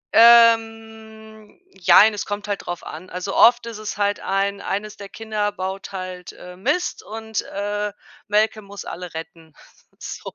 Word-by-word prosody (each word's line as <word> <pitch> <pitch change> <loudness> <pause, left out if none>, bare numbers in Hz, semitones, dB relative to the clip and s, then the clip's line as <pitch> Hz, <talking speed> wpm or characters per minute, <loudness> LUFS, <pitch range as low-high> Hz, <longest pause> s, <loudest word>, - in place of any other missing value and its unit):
Ähm, 225 -2 +3
Jein, 200 +4 +6
es 205 - -4
kommt 205 0 -4
halt 205 -1 -4
drauf 175 -1 -5
an. 180 +4 -9
Also, 180 +2 -5
oft 240 0 +6
ist 230 -2 -7
es 215 -1 -5
halt 205 0 0
ein 200 +1 -1
eines 205 +2 -4
der 200 -1 -10
Kinder 215 -1 -3
baut 190 0 -5
halt, 185 -2 -7
äh, 180 0 -12
Mist 290 - -1
und, 220 0 -4
äh, 205 +1 -3 0.4
Malcolm 215 0 +1
muss 200 -1 -9
alle 180 -2 -8
retten. 160 -1 -9 0.5
So - - -7
205 Hz, 155 wpm, -22 LUFS, 195-220 Hz, 0.5 s, Jein